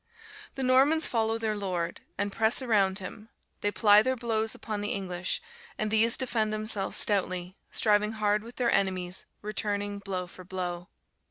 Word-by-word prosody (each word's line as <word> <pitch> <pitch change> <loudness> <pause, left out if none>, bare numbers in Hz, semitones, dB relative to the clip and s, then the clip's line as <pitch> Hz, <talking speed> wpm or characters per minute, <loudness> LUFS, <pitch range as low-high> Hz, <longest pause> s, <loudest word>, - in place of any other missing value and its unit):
The 270 - -3
Normans 270 +5 +4
follow 225 -1 +1
their 220 -1 -1
lord, 180 -4 -3 0.2
and 205 +1 -1
press 225 +5 +2
around 200 -6 +3
him; 210 +3 -8 0.3
they 205 - +1
ply 205 0 +6
their 260 +3 0
blows 225 -2 -1
upon 215 -2 -4
the 205 - -1
English; 180 -2 -2 0.3
and 215 -1 -1
these 225 +2 +5
defend 230 -4 0
themselves 215 -2 -1
stoutly, 185 -3 +1 0.2
striving 210 0 +2
hard 210 -1 +1
with 235 +2 -11
their 240 -2 +1
enemies, 185 -2 0 0.2
returning 205 -1 -2
blow 190 -2 -4
for 185 +1 -12
blow. 180 -1 -4
210 Hz, 160 wpm, -28 LUFS, 190-225 Hz, 0.3 s, ply